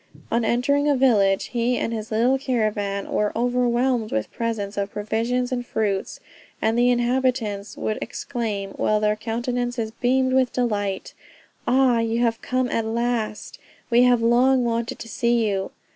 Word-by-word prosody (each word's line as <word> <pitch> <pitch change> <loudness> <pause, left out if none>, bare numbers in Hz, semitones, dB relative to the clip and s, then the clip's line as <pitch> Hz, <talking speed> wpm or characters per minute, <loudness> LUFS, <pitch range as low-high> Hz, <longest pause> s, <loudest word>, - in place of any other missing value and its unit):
On 235 +1 +2
entering 280 +6 +2
a 285 - +3
village, 210 -7 +3
he 240 +1 +1
and 230 - -2
his 220 -1 -5
little 245 +4 +2
caravan 210 -6 -1
were 210 0 +1
overwhelmed 245 -1 +1
with 110 - -2
presents 220 -3 -3
of 200 0 -2
provisions 230 +4 -1
and 245 -1 -1
fruits; 205 -5 -2 0.4
and 220 +1 +1
the 240 +1 +4
inhabitants 240 -4 0
would 215 - -2
exclaim, 220 -6 -4
while 215 +1 +1
their 210 0 +1
countenances 240 +1 -2
beamed 260 +2 +1
with 260 -2 +3
delight, 205 -6 -2 0.5
"Ah, 255 -2 +4
you 230 0 0
have 230 -1 +1
come 255 0 0
at 230 - 0
last; 230 -2 -2 0.3
we 235 +1 +5
have 245 -2 +4
long 250 +2 +4
wanted 235 0 -2
to - - -9
see 235 0 +1
you!" 195 -2 -1
235 Hz, 155 wpm, -23 LUFS, 215-245 Hz, 0.5 s, we